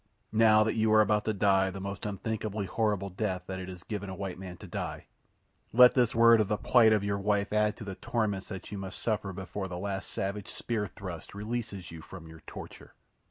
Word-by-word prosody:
"Now 110 -1 +6
that 110 - 0
you 110 -1 +2
are 110 - +7
about 105 0 +2
to 110 - +2
die 95 -1 +3
the 95 - -6
most 100 +2 -5
unthinkably 105 0 -3
horrid 100 -2 -1
death 95 -3 -1
that 95 0 -5
it 95 0 -6
is 90 -1 -9
given 100 -2 -5
a 95 - -5
white 95 -1 -5
man 90 -2 -8
to - - -11
die—let 125 +1 +1
this 120 -3 +2
word 115 -1 +7
of 105 - 0
the 105 +1 0
plight 115 -1 +5
of 105 -2 +3
your 100 0 -1
wife 100 0 0
add 105 0 +2
to - - -8
the 100 -2 -5
torments 105 -1 -2
that 95 -1 -8
you 100 - -4
must 95 +1 -6
suffer 105 -3 -1
before 95 +1 -5
the 90 -1 -6
last 95 +1 -4
savage 100 0 -3
spear 110 -3 -3
thrust 90 -2 -8
releases 105 -4 -4
you 80 -1 -9
from 80 -1 -11
your 80 0 -12
torture." - - -10
100 Hz, 215 wpm, -30 LUFS, 95-110 Hz, -, are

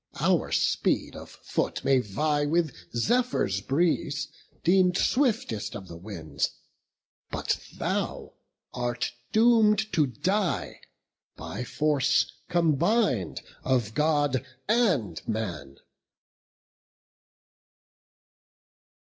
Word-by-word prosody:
Our - - +2
speed - - +1
of - - -9
foot - - -3
may 135 -1 +4
vie 145 +7 0
with 160 -2 +1 0.2
Zephyr's 120 - +1
breeze, 145 - 0 0.3
Deem'd 180 0 +4
swiftest 225 - 0
of 95 -2 -7
the 85 - -9
winds; 85 -5 -3 0.8
but - - -2
thou - - -2 0.4
art 120 -1 -2 0.2
doom'd 220 -2 +4
To 150 -3 +3
die, 185 - -1 0.5
by 110 +6 -6
force 145 +1 +1 0.2
combin'd 170 - +2 0.2
of 120 -5 +1
God 145 -2 +1 0.2
and 180 - +2
man." 85 -12 -4
145 Hz, 85 wpm, -27 LUFS, 110-185 Hz, 0.8 s, may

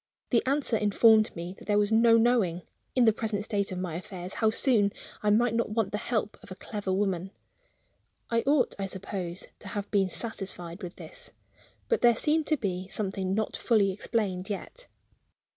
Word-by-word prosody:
The 235 - +4
answer 275 -3 +1
informed 215 +1 +4
me 170 +1 -5
that - - -13
there 205 -1 +3
was 205 +1 +2
no 230 +1 +6
knowing, 225 -8 +2 0.3
in 250 -2 +5
the 220 - +5
present 210 -2 -2
state 200 -3 -1
of 185 - -4
my 180 -3 -3
affairs, 180 +1 -6
how 220 - +2
soon 215 -3 +3 0.3
I 210 - +1
might 230 +2 +3
not 230 -1 0
want 210 -2 0
the 210 - -2
help 215 -3 -2
of - - -13
a 185 - -7
clever 205 0 -5
woman. 190 -2 0 1.0
I 230 0 +1
ought, 280 -3 +3
I 195 - -2
suppose, 190 -1 -5
to - - -10
have 205 -1 -5
been 195 -2 +2
satisfied 190 -5 -4
with 180 -2 -7
this. - - -9 0.6
But 465 - +1
there 240 -1 +6
seemed 305 +5 +2
to 310 - +2
be 185 -5 -3
something 190 -2 -2
not 215 0 -1
fully 210 -5 +2
explained 195 -2 -2
yet. 455 - -6
210 Hz, 185 wpm, -28 LUFS, 190-230 Hz, 1.0 s, no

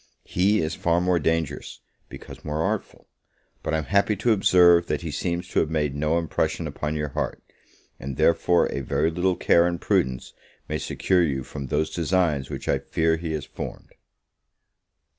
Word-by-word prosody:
He 100 +4 +2
is 80 +1 -2
far 85 0 +1
more 90 -1 +2
dangerous, 80 -2 -2 0.3
because - - -11
more 75 +1 -2
artful: - - -3 0.5
but 80 - -1
I - - +2
am 80 - -2
happy 100 +5 +2
to 110 +5 +1
observe, 90 -4 +5
that - - -1
he 85 -2 -5
seems 85 +4 -2
to - - +1
have 80 - +1
made 75 -3 0
no 75 +3 0
impression 80 0 -1
upon 75 +1 -3
your 75 -1 -2
heart; - - -4 0.6
and 65 0 -6
therefore 85 +1 +3
a - - -2
very 75 +4 0
little 90 +2 +1
care 85 0 +4
and 85 -1 -2
prudence 65 -1 0 0.3
may 75 0 -2
secure 95 -2 +1
you 70 -6 0
from 70 +1 -7
those 75 +3 0
designs 85 -5 0
which - - -6
I - - +2
fear 80 0 0
he 80 -1 -4
has 75 -3 -3
formed. - - -8
80 Hz, 180 wpm, -24 LUFS, 75-85 Hz, 0.6 s, observe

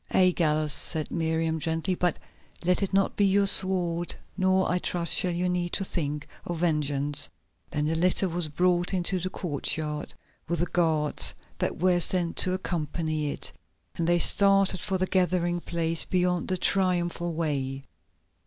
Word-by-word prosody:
"Aye, 185 -1 +4
Gallus," 155 -2 +1
said 155 -3 -2
Miriam 160 -1 -1
gently, 165 +4 -1
"but 175 -2 0 0.5
let 180 +2 +2
it 195 - -1
not 195 0 +1
be 205 - +2
your 200 0 +3
sword, 180 -3 +3 0.2
nor, 190 -1 +2
I 180 - 0
trust, 170 -2 0
shall 180 - +3
you 175 +1 -1
need 175 -1 -2
to 195 - -1
think 150 -5 -3 0.2
of 175 - -4
vengeance." 145 -4 0 0.4
Then 150 0 -2
the 155 - 0
litter 180 +3 +2
was 175 -1 -1
brought 175 +4 +1
into 185 +1 -1
the 185 +2 -3
courtyard, 150 -3 -3 0.3
with 170 +1 -1
the 170 - 0
guards 160 -4 0 0.2
that - - -2
were 180 +1 +2
sent 175 -1 +1
to 185 - +4
accompany 155 -4 -2
it, - - -4 0.4
and 165 - -2
they 175 0 +4
started 195 +1 +5
for 195 -2 -1
the 185 - 0
gathering 180 -2 0
place 165 -1 -1
beyond 180 -1 0
the 185 - 0
Triumphal 175 -2 0
Way. 140 -4 -2
175 Hz, 160 wpm, -27 LUFS, 160-185 Hz, 0.5 s, started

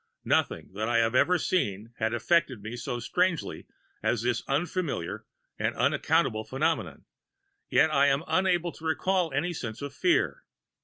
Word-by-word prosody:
"Nothing - - 0
that 110 +3 -2
I 120 - +2
had 115 0 +2
ever 145 +8 +4
seen 115 - -1
had 110 0 0
affected 130 -1 +1
me 110 +2 -5
so 120 0 -4
strangely 175 +7 -1 0.3
as 115 -2 0
this 120 -1 0
unfamiliar 155 - -2 0.3
and - - 0
unaccountable 110 0 +1
phenomenon, 155 +8 -2 0.6
yet 160 - +4
I 140 0 +5
am 140 +2 +2
unable 180 -2 +1
to 160 - -16
recall 180 +2 +1
any 155 +6 -1
sense 120 -7 -5
of 140 -1 -6
fear. 370 +7 +1
140 Hz, 150 wpm, -28 LUFS, 115-175 Hz, 0.6 s, I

